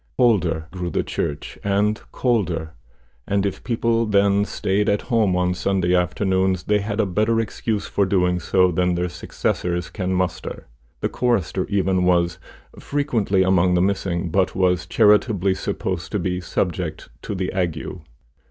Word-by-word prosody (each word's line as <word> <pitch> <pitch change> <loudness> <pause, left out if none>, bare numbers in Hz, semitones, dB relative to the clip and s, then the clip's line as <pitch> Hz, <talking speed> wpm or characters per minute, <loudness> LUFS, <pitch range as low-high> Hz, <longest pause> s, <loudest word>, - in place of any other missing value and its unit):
Older 90 -10 +2
grew 90 -1 -4
the - - -1
church, 75 0 -4
and 105 +2 +1
colder; 90 -10 -1 0.5
and 100 0 +1
if 100 - -3
people 115 -1 +1
then 100 0 +3
staid 100 0 0
at 100 - +1
home 110 -7 +2
on 90 0 +1
Sunday 90 -1 0
afternoons, 95 +1 +1
they 105 +1 +2
had 105 +1 -3
a 110 - +3
better 110 +4 +1
excuse 110 -1 -2
for 100 -2 0
doing 90 -2 +2
so 90 +2 +2
than 90 +1 +1
their 90 +1 -1
successors 85 0 -2
can 95 -3 -3
muster. 90 -2 -2 0.4
The - - 0
chorister, 120 -9 0
even, 95 -2 +1
was 85 -2 +2 0.4
frequently 115 -10 0
among 90 -1 +3
the 90 - +3
missing, 95 -3 -1
but 95 +1 +1
was 90 -2 +1
charitably 105 -1 +3
supposed 90 -2 -3
to - - +2
be 90 -1 -2
subject 90 -2 -3
to 105 - -5
the 95 -1 -2
ague. 85 -5 -1
95 Hz, 150 wpm, -22 LUFS, 90-105 Hz, 0.5 s, then